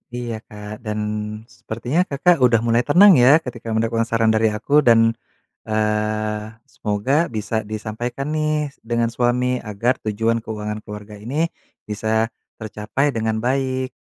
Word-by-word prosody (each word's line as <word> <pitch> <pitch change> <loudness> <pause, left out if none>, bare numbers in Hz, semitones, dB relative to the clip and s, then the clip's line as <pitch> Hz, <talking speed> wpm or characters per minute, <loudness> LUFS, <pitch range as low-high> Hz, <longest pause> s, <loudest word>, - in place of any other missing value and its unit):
Iya, 120 -2 -4
Kak, 105 +1 -9
dan 105 -1 -3 0.5
sepertinya 125 +10 -2
Kakak 165 -1 +2
udah 120 -3 +5
mulai 115 +1 +2
tenang 185 +6 +7
ya, 140 +5 +7
ketika 120 -6 -7
mendengarkan 115 +1 +1
saran 115 0 +1
dari 110 0 +3
aku, 140 +8 +2
dan, 115 -1 +5 0.5
eee, 110 0 -1 0.2
semoga 120 +13 0
bisa 110 -2 -3
disampaikan 110 +6 -4
nih 155 -1 0 0.2
dengan 115 0 0
suami 125 +1 +1
agar 115 +4 -1
tujuan 115 +2 +1
keuangan 105 -1 -5
keluarga 105 0 -9
ini 145 +10 -1 0.4
bisa 110 +2 0 0.2
tercapai 110 +6 -2
dengan 110 -2 -2
baik. 130 0 -1
115 Hz, 130 wpm, -21 LUFS, 110-130 Hz, 0.5 s, tenang